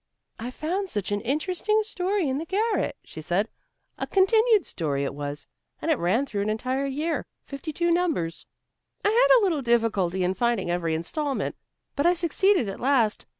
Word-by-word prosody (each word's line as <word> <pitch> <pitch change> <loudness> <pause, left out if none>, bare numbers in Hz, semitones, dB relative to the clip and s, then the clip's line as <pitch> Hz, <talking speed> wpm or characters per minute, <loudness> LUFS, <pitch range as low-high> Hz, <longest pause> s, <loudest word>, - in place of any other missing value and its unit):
"I 235 +2 -4
found 360 +9 -3
such 205 - -3
an 205 0 0
interesting 365 - 0
story 380 -3 -1
in 265 +1 -1
the 325 - -4
garret," 420 +5 0
she 160 - -9
said, 185 +7 0 0.5
"a - - -2
continued 435 +1 +4
story 145 -4 -2
it 140 - -2
was, 145 +1 -5 0.3
and 325 - 0
it 300 - +2
ran 205 +11 +2
through 205 -7 -3
an 205 - -1
entire 255 +5 -1
year, 305 +5 -2 0.2
fifty 280 +3 -6
two 340 +3 +1
numbers. 320 - 0 0.6
I - - +5
had - - +6
a - - 0
little 335 -7 +1
difficulty 215 -7 +1
in 180 +1 +1
finding 230 -5 0
every 170 -2 0
instalment, 275 - -2 0.4
but 285 +4 +2
I 355 - +4
succeeded 350 - +2
at 195 - -5
last. 245 -5 +1
275 Hz, 180 wpm, -26 LUFS, -, 0.6 s, had